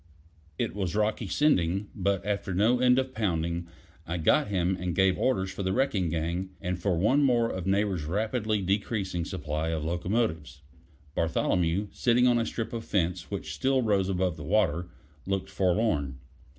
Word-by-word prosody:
It -, -, -1 dB
was 95 Hz, -3 st, -2 dB
rocky 105 Hz, 0 st, 0 dB
sending, 100 Hz, -, +1 dB
but 100 Hz, 0 st, -1 dB
after 100 Hz, -2 st, -2 dB
no 115 Hz, +6 st, +3 dB
end 125 Hz, 0 st, +5 dB
of 130 Hz, 0 st, -1 dB
pounding, 85 Hz, -5 st, -1 dB, 0.4 s
I 85 Hz, +2 st, -2 dB
got 80 Hz, -, +3 dB
him 95 Hz, -2 st, 0 dB
and 90 Hz, -1 st, -2 dB
gave 95 Hz, 0 st, +4 dB
orders 95 Hz, -8 st, 0 dB
for -, -, -6 dB
the 95 Hz, 0 st, 0 dB
wrecking 110 Hz, -9 st, +1 dB
gang, 85 Hz, +3 st, -2 dB
and 90 Hz, -2 st, -3 dB
for 90 Hz, -1 st, 0 dB
one 115 Hz, -, +3 dB
more 120 Hz, -4 st, +3 dB
of 95 Hz, 0 st, -4 dB
Neighbor's 95 Hz, -4 st, +1 dB
rapidly 105 Hz, +3 st, -1 dB
decreasing 95 Hz, -2 st, -1 dB
supply 75 Hz, -2 st, -3 dB
of 80 Hz, -2 st, -2 dB
locomotives. 85 Hz, -, -2 dB, 0.5 s
Bartholomew, 85 Hz, +4 st, 0 dB
sitting 125 Hz, 0 st, +3 dB
on 120 Hz, -1 st, +4 dB
a 115 Hz, -, -1 dB
strip 115 Hz, 0 st, -4 dB
of 115 Hz, -1 st, -4 dB
fence 90 Hz, -5 st, -1 dB
which -, -, -4 dB
still 130 Hz, -1 st, +1 dB
rose 100 Hz, -4 st, +2 dB
above 90 Hz, -3 st, -1 dB
water, 85 Hz, +1 st, +1 dB, 0.4 s
looked 95 Hz, -1 st, -2 dB
forlorn. 90 Hz, -, +1 dB
95 Hz, 165 wpm, -28 LUFS, 85-110 Hz, 0.5 s, end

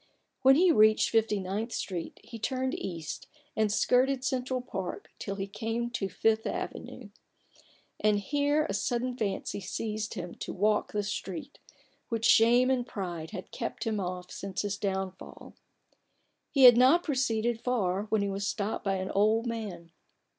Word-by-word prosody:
When 265 Hz, +1 st, +7 dB
he 355 Hz, +3 st, +5 dB
reached 215 Hz, -6 st, +5 dB
Fifty 220 Hz, -2 st, +2 dB
ninth 200 Hz, +5 st, -3 dB
Street, 175 Hz, -4 st, -4 dB
he 230 Hz, -, -9 dB
turned 260 Hz, +3 st, -1 dB
east 165 Hz, -5 st, -5 dB, 0.3 s
and 215 Hz, -1 st, +2 dB
skirted 255 Hz, +4 st, +2 dB
Central 255 Hz, 0 st, -1 dB
Park 190 Hz, -7 st, -6 dB
till 200 Hz, -, -4 dB
he 195 Hz, -1 st, -3 dB
came 225 Hz, +4 st, -3 dB
to 210 Hz, -5 st, -2 dB
the 185 Hz, -, -15 dB
Fifth 225 Hz, 0 st, +2 dB
Avenue. -, -, -5 dB, 0.9 s
And 210 Hz, -1 st, +3 dB
here 290 Hz, +8 st, +1 dB
a 195 Hz, -, -3 dB
sudden 240 Hz, +5 st, -1 dB
fancy 200 Hz, -3 st, -2 dB
seized 215 Hz, +3 st, -4 dB
him 175 Hz, 0 st, -5 dB
to -, -, -5 dB
walk 210 Hz, +2 st, +1 dB
this 205 Hz, -1 st, -2 dB
street, 195 Hz, +9 st, -5 dB, 0.5 s
which 230 Hz, -1 st, -1 dB
shame 240 Hz, +3 st, +5 dB
and 250 Hz, -2 st, 0 dB
pride 175 Hz, -7 st, -5 dB
had 185 Hz, -, -8 dB
kept -, -, -4 dB
him 220 Hz, -3 st, -1 dB
off 180 Hz, -1 st, -4 dB
since 195 Hz, 0 st, -4 dB
his 205 Hz, -1 st, -2 dB
downfall. 190 Hz, -1 st, -5 dB, 1.0 s
He 275 Hz, -3 st, +3 dB
had 245 Hz, -2 st, +10 dB
not 270 Hz, +8 st, +6 dB
proceeded 240 Hz, -5 st, 0 dB
far, 205 Hz, -6 st, 0 dB
when 215 Hz, -1 st, +1 dB
he -, -, 0 dB
was 200 Hz, +1 st, -2 dB
stopped 210 Hz, 0 st, -2 dB
by 195 Hz, -1 st, 0 dB
an 185 Hz, 0 st, -3 dB
old 215 Hz, +3 st, +3 dB
man. 205 Hz, -8 st, -5 dB
215 Hz, 160 wpm, -29 LUFS, 195-245 Hz, 1.0 s, had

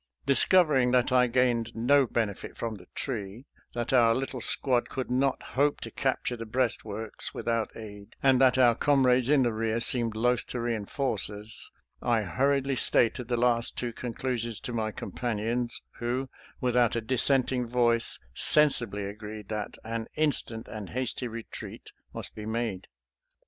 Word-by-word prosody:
Discovering 140 Hz, -1 st, +4 dB
that 125 Hz, 0 st, +3 dB
I 125 Hz, -1 st, +4 dB
gained 120 Hz, -2 st, +1 dB
no 130 Hz, +4 st, +3 dB
bene 110 Hz, -3 st, 0 dB
fit -, -, -11 dB
from 115 Hz, -1 st, -3 dB
the 100 Hz, -, -12 dB
tree, 115 Hz, -1 st, -5 dB, 0.3 s
that 120 Hz, +1 st, -2 dB
our 115 Hz, -3 st, +5 dB
little 130 Hz, -1 st, -3 dB
squad 125 Hz, -1 st, +2 dB
could 130 Hz, -2 st, -4 dB
not 135 Hz, +1 st, +1 dB
hope 145 Hz, +2 st, +2 dB
to -, -, -6 dB
capture 130 Hz, -2 st, -1 dB
the 115 Hz, -1 st, -7 dB
breastworks 110 Hz, -3 st, -2 dB
without 115 Hz, -1 st, -2 dB
aid, 105 Hz, -2 st, -10 dB
and 135 Hz, -1 st, +4 dB
that 130 Hz, -1 st, +5 dB
our 125 Hz, -2 st, +6 dB
comrades 130 Hz, -1 st, +3 dB
in 145 Hz, -3 st, +5 dB
the 120 Hz, -2 st, +1 dB
rear 110 Hz, +1 st, -1 dB
seemed 115 Hz, -1 st, +2 dB
loath 120 Hz, +2 st, +1 dB
to 125 Hz, -, -4 dB
reinforce 115 Hz, 0 st, -1 dB
us, 105 Hz, +1 st, -7 dB, 0.3 s
I 115 Hz, -3 st, +1 dB
hurriedly 135 Hz, +7 st, +1 dB
stated 120 Hz, +1 st, +1 dB
the 120 Hz, -1 st, 0 dB
last 120 Hz, -1 st, +1 dB
two 120 Hz, -2 st, -3 dB
conclusions 120 Hz, -2 st, -3 dB
to 125 Hz, -3 st, -5 dB
my 110 Hz, -2 st, -1 dB
companions, 120 Hz, +1 st, -3 dB, 0.2 s
who, 125 Hz, +2 st, -2 dB, 0.3 s
without 125 Hz, -2 st, +2 dB
a 115 Hz, -, 0 dB
dissenting 130 Hz, +1 st, +2 dB
voice, 120 Hz, -1 st, +2 dB, 0.2 s
sensibly 120 Hz, -, +4 dB
agreed 105 Hz, 0 st, -8 dB
that 105 Hz, -1 st, -4 dB
an 115 Hz, 0 st, -4 dB
instant 130 Hz, -7 st, 0 dB
and 105 Hz, -3 st, -7 dB
hasty 125 Hz, 0 st, -3 dB
retreat 115 Hz, -1 st, -8 dB, 0.2 s
must -, -, -6 dB
be 105 Hz, 0 st, -7 dB
made. 110 Hz, -4 st, -3 dB
120 Hz, 155 wpm, -28 LUFS, 110-130 Hz, 0.3 s, our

